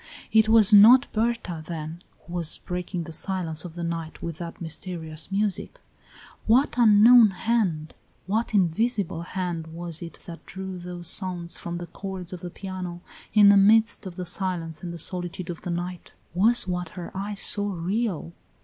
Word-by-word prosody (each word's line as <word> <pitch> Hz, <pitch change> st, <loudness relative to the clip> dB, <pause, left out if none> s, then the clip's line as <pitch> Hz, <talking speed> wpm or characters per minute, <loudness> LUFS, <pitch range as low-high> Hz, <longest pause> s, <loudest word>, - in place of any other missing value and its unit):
It 220 Hz, 0 st, +4 dB
was 220 Hz, -2 st, +6 dB
not 235 Hz, +6 st, +9 dB
Berta, 225 Hz, -7 st, -1 dB
then, 160 Hz, +1 st, -6 dB, 0.2 s
who 170 Hz, -, -10 dB
was 170 Hz, -3 st, -1 dB
breaking 180 Hz, 0 st, -4 dB
the 165 Hz, 0 st, -9 dB
silence 170 Hz, -3 st, -3 dB
of 170 Hz, -2 st, -9 dB
the 175 Hz, -, -5 dB
night 165 Hz, -1 st, -4 dB
with 165 Hz, -2 st, -6 dB
that 170 Hz, -1 st, -7 dB
mysterious 160 Hz, -1 st, -6 dB
music. 200 Hz, 0 st, -1 dB, 0.7 s
What 250 Hz, +6 st, +4 dB
unknown 230 Hz, 0 st, +7 dB
hand, 190 Hz, -6 st, -1 dB, 0.3 s
what 220 Hz, +4 st, -1 dB
invisible 200 Hz, -1 st, +1 dB
hand 175 Hz, -2 st, -4 dB
was 165 Hz, 0 st, -6 dB
it 170 Hz, -1 st, -8 dB
that 170 Hz, -1 st, -10 dB
drew 190 Hz, -1 st, -6 dB
those 175 Hz, -1 st, -6 dB
sounds 175 Hz, -2 st, -1 dB
from 170 Hz, 0 st, -5 dB
the 175 Hz, -, -6 dB
chords 190 Hz, -1 st, -7 dB
of 180 Hz, -, -6 dB
the 175 Hz, -, -7 dB
piano 180 Hz, -2 st, -7 dB, 0.3 s
in 205 Hz, -1 st, +8 dB
the 200 Hz, -, +7 dB
midst 215 Hz, +1 st, +4 dB
of 180 Hz, -, -8 dB
the 180 Hz, 0 st, -5 dB
silence 175 Hz, -3 st, -2 dB
and 175 Hz, -, -5 dB
the 170 Hz, -, -7 dB
solitude 175 Hz, +1 st, -4 dB
of 170 Hz, -, -9 dB
the -, -, -6 dB
night! 175 Hz, 0 st, -5 dB, 0.2 s
Was 220 Hz, +5 st, +3 dB
what 180 Hz, -2 st, -2 dB
her 175 Hz, -, -6 dB
eyes 200 Hz, +1 st, -4 dB
saw 205 Hz, -1 st, +1 dB
real! 185 Hz, 0 st, -2 dB
180 Hz, 170 wpm, -25 LUFS, 170-205 Hz, 0.7 s, not